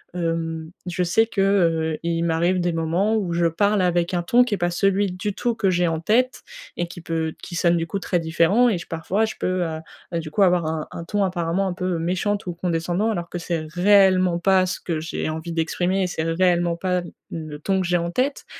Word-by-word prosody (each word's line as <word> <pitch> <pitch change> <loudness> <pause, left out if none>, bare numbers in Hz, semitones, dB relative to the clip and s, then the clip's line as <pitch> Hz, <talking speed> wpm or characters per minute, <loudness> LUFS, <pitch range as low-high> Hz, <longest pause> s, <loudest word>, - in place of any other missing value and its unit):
hem, 165 -1 -2 0.2
je 180 +1 -1
sais 225 +6 +3
que, 200 -4 -1
heu, 165 -5 +2
il 170 0 0
m'arrive 170 +2 +1
des 175 0 +1
moments 170 +7 +1
où 180 -5 -2
je 170 0 +1
parle 200 +4 +1
avec 175 0 +1
un 175 - +1
ton 240 +8 +5
qui 225 - -3
est - - -6
pas 175 0 0
celui 195 +1 +1
du 190 +3 -3
tout 240 -1 0
que 195 -4 +1
j'ai 175 -1 +2
en 160 -1 -1
tête 245 +9 +1 0.3
et 175 - -1
qui 175 -1 -10
peut 160 -1 -2
qui 175 - -7
sonne 170 +1 +3
du 165 0 -2
coup 200 - -3
très 180 -2 0
différent, 170 +9 +3
et 195 - 0
j 175 - -8
parfois, 180 +6 0
je 220 - -5
peux, 185 -1 0
heu 160 -1 -3 0.3
heu, 170 - 0
du 155 -2 -7
coup, 200 - 0
avoir 175 -3 +3
un 160 -1 -3
un 170 - -6
ton, 205 +3 0
apparemment, 180 +1 0
un 180 - -2
peu 180 -1 -2
méchante 185 +4 -1
ou 175 - -2
condescendant 175 +4 -1
alors 175 -4 -4
que 175 - -5
c'est 165 -2 -3
réellement 185 -2 +4
pas 190 0 +3
ce 180 - -3
que 165 -3 -2
j'ai 160 0 -3
envie 160 +2 -5
d'exprimer 175 +3 0
et 185 - 0
c'est 160 -2 -3
réellement 175 0 +2
pas 180 +1 -1 0.3
le 155 -3 -6
ton 190 +4 0
que - - -2
j'ai 180 - +2
en 170 0 -2
tête. 270 +7 -1
175 Hz, 235 wpm, -23 LUFS, 165-190 Hz, 0.3 s, ton